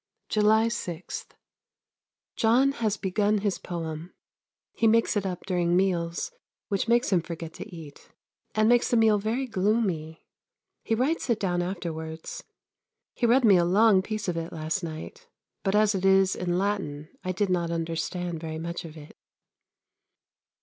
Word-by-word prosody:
July 220 Hz, +1 st, +4 dB
6. 180 Hz, -7 st, -5 dB, 1.1 s
John 245 Hz, +5 st, +4 dB
has 220 Hz, -6 st, -1 dB
begun 205 Hz, +2 st, +1 dB
his 205 Hz, -1 st, -1 dB
poem. 165 Hz, 0 st, -6 dB, 0.6 s
He 225 Hz, -, +2 dB
makes 230 Hz, +1 st, +3 dB
it 200 Hz, -2 st, 0 dB
up 180 Hz, -1 st, -5 dB
during 175 Hz, -2 st, +1 dB
meals, 175 Hz, -, 0 dB, 0.4 s
which 200 Hz, +1 st, 0 dB
makes 240 Hz, +1 st, +3 dB
him 175 Hz, -, +4 dB
forget 165 Hz, -1 st, -7 dB
to -, -, -8 dB
eat, 160 Hz, -6 st, -11 dB, 0.5 s
and 215 Hz, 0 st, +3 dB
makes 240 Hz, +1 st, +4 dB
the 240 Hz, -, +3 dB
meal 220 Hz, -2 st, +4 dB
very 225 Hz, +6 st, -1 dB
gloomy; 190 Hz, -7 st, -1 dB, 0.6 s
he 225 Hz, -, 0 dB
writes 270 Hz, +6 st, 0 dB
it 230 Hz, -2 st, +2 dB
down 175 Hz, -3 st, 0 dB
afterwards. 165 Hz, -3 st, -5 dB, 0.7 s
He 240 Hz, -, +1 dB
read 245 Hz, +2 st, +4 dB
me 200 Hz, -4 st, +7 dB
a 175 Hz, -, +4 dB
long 195 Hz, +2 st, +5 dB
piece 215 Hz, +1 st, -4 dB
of 175 Hz, -2 st, -1 dB
it 165 Hz, 0 st, -4 dB
last 160 Hz, +4 st, -2 dB
night; 160 Hz, -1 st, -7 dB, 0.3 s
but 195 Hz, 0 st, 0 dB
as 215 Hz, 0 st, +4 dB
it 190 Hz, -1 st, -2 dB
is 195 Hz, 0 st, +4 dB
in 175 Hz, -1 st, -1 dB
Latin 180 Hz, -7 st, -2 dB
I 185 Hz, -, -1 dB
did 190 Hz, +1 st, 0 dB
not 170 Hz, -2 st, +1 dB
understand 165 Hz, +1 st, -3 dB
very 160 Hz, -1 st, -5 dB
much 170 Hz, +1 st, -5 dB
of 160 Hz, -1 st, -10 dB
it. 150 Hz, -1 st, -12 dB
190 Hz, 155 wpm, -27 LUFS, 170-215 Hz, 1.1 s, me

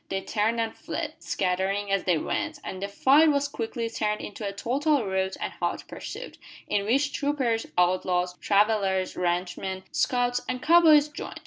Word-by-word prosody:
They 195 Hz, 0 st, -2 dB
turned 220 Hz, +3 st, 0 dB
and 225 Hz, -1 st, -2 dB
fled, -, -, -5 dB
scattering 195 Hz, +2 st, -1 dB
as 195 Hz, -1 st, +1 dB
they 180 Hz, -3 st, +3 dB
went, 315 Hz, -, -2 dB
and 185 Hz, -, -6 dB
the 200 Hz, -, -2 dB
fight 275 Hz, +10 st, +5 dB
was 285 Hz, -1 st, +1 dB
quickly 230 Hz, -3 st, -4 dB
turned 210 Hz, -2 st, -1 dB
into 210 Hz, -, -7 dB
a 200 Hz, -, -2 dB
total 270 Hz, +5 st, 0 dB
rout 190 Hz, 0 st, -1 dB
and -, -, -4 dB
hot -, -, -3 dB
pursuit, -, -, -8 dB, 0.3 s
in 200 Hz, 0 st, -1 dB
which 275 Hz, +5 st, +2 dB
troopers, 265 Hz, -7 st, 0 dB
outlaws, 180 Hz, 0 st, +1 dB
travellers, 200 Hz, -2 st, +2 dB
ranch 180 Hz, 0 st, -1 dB
men, 190 Hz, -1 st, -4 dB
scouts, 245 Hz, 0 st, +1 dB
and 255 Hz, -, -2 dB
cow 340 Hz, +2 st, +6 dB
boys 305 Hz, -3 st, +6 dB
joined. 295 Hz, -, -8 dB
210 Hz, 175 wpm, -26 LUFS, 190-265 Hz, 0.3 s, cow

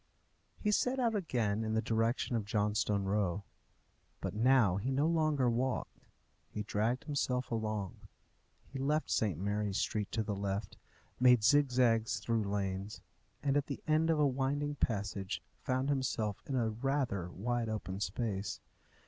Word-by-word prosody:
He 210 Hz, -, +1 dB
set 250 Hz, +5 st, +2 dB
out 235 Hz, -3 st, +2 dB
again 115 Hz, -, 0 dB
in 110 Hz, 0 st, -1 dB
the -, -, +3 dB
direction 115 Hz, +3 st, 0 dB
of 115 Hz, -, 0 dB
Johnstone 105 Hz, 0 st, +1 dB
Row. 100 Hz, -1 st, 0 dB, 0.8 s
But -, -, -3 dB
now 115 Hz, -4 st, +4 dB
he 105 Hz, +7 st, -2 dB
no 135 Hz, +3 st, +2 dB
longer 155 Hz, -5 st, +2 dB
walked; 125 Hz, +2 st, -1 dB, 0.5 s
he 105 Hz, -, -4 dB
dragged 110 Hz, +4 st, 0 dB
himself 130 Hz, -4 st, -1 dB
along. 110 Hz, -4 st, -2 dB, 0.7 s
He 135 Hz, -, -8 dB
left 150 Hz, +3 st, 0 dB
St. 100 Hz, -8 st, +1 dB
Mary's 100 Hz, +1 st, -1 dB
Street 105 Hz, -2 st, -1 dB
to 110 Hz, -, +1 dB
the 105 Hz, -1 st, -2 dB
left, 100 Hz, 0 st, -3 dB, 0.4 s
made 125 Hz, -3 st, +6 dB
zigzags 125 Hz, -4 st, +3 dB
through 115 Hz, -2 st, 0 dB
lanes, 100 Hz, 0 st, -3 dB, 0.4 s
and 140 Hz, -1 st, +2 dB
at 145 Hz, -1 st, +1 dB
the 140 Hz, -, -5 dB
end 155 Hz, +1 st, +3 dB
of 160 Hz, -, +3 dB
a 150 Hz, -, +5 dB
winding 140 Hz, +2 st, 0 dB
passage 100 Hz, -7 st, -2 dB, 0.2 s
found 130 Hz, +2 st, 0 dB
himself 120 Hz, -7 st, -1 dB
in 135 Hz, -, -2 dB
a 115 Hz, -3 st, +1 dB
rather 120 Hz, -6 st, -1 dB
wide 115 Hz, +5 st, -2 dB
open 100 Hz, -3 st, -4 dB
space. 105 Hz, -2 st, -2 dB
115 Hz, 150 wpm, -33 LUFS, 105-135 Hz, 0.8 s, made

